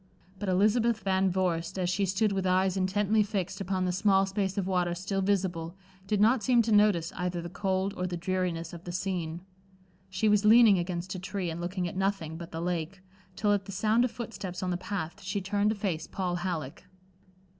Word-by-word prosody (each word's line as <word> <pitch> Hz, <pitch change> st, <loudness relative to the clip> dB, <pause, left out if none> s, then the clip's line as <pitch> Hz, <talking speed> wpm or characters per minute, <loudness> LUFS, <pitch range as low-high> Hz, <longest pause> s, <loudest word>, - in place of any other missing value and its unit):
But 205 Hz, -1 st, -2 dB
Elizabeth 220 Hz, +4 st, +2 dB
Van 190 Hz, 0 st, +2 dB
Vorst 175 Hz, -2 st, -1 dB
as 180 Hz, -1 st, 0 dB
she 195 Hz, +2 st, 0 dB
stood 200 Hz, +3 st, +1 dB
with 190 Hz, -1 st, -1 dB
eyes 185 Hz, +1 st, +2 dB
intently 205 Hz, +3 st, +2 dB
fixed 200 Hz, -3 st, -2 dB
upon 190 Hz, -1 st, -1 dB
the 180 Hz, -, +1 dB
small 195 Hz, +1 st, +3 dB
space 195 Hz, 0 st, -2 dB
of 195 Hz, -, 0 dB
water 180 Hz, -2 st, 0 dB
still 195 Hz, +2 st, -2 dB
visible, 185 Hz, -4 st, -1 dB, 0.3 s
did 210 Hz, 0 st, +1 dB
not 225 Hz, +4 st, +4 dB
seem 240 Hz, +2 st, +4 dB
to 225 Hz, -, -1 dB
notice 205 Hz, -6 st, +3 dB
either 180 Hz, -1 st, -2 dB
the 170 Hz, 0 st, -6 dB
cold 190 Hz, +1 st, -1 dB
or 180 Hz, -, -2 dB
the 175 Hz, -1 st, -4 dB
dreariness 175 Hz, -2 st, -2 dB
of 170 Hz, 0 st, -9 dB
the 175 Hz, -, -5 dB
scene. 175 Hz, -2 st, -3 dB, 0.7 s
She 190 Hz, +3 st, 0 dB
was 210 Hz, -1 st, +4 dB
leaning 215 Hz, -2 st, +7 dB
against 175 Hz, +1 st, -3 dB
a 185 Hz, -, -5 dB
tree, 185 Hz, -1 st, -3 dB
and 165 Hz, +1 st, -5 dB
looking 180 Hz, +1 st, -2 dB
at 175 Hz, -, -7 dB
nothing 190 Hz, -5 st, -1 dB
but 170 Hz, +1 st, -8 dB
the 165 Hz, -, -4 dB
lake, 175 Hz, +2 st, -3 dB, 0.3 s
till 205 Hz, +1 st, +2 dB
at 200 Hz, -1 st, -1 dB
the 200 Hz, -, -7 dB
sound 215 Hz, +5 st, +2 dB
of 250 Hz, -, +1 dB
foot 230 Hz, -1 st, -7 dB
steps 185 Hz, -1 st, -5 dB
on 180 Hz, -, -1 dB
the -, -, 0 dB
path, 185 Hz, -2 st, -5 dB
she 195 Hz, +3 st, -2 dB
turned 200 Hz, +2 st, 0 dB
to 220 Hz, -, 0 dB
face 185 Hz, -6 st, -3 dB
Paul 180 Hz, -2 st, -2 dB
Halleck. 175 Hz, -6 st, -4 dB
190 Hz, 210 wpm, -29 LUFS, 175-200 Hz, 0.7 s, leaning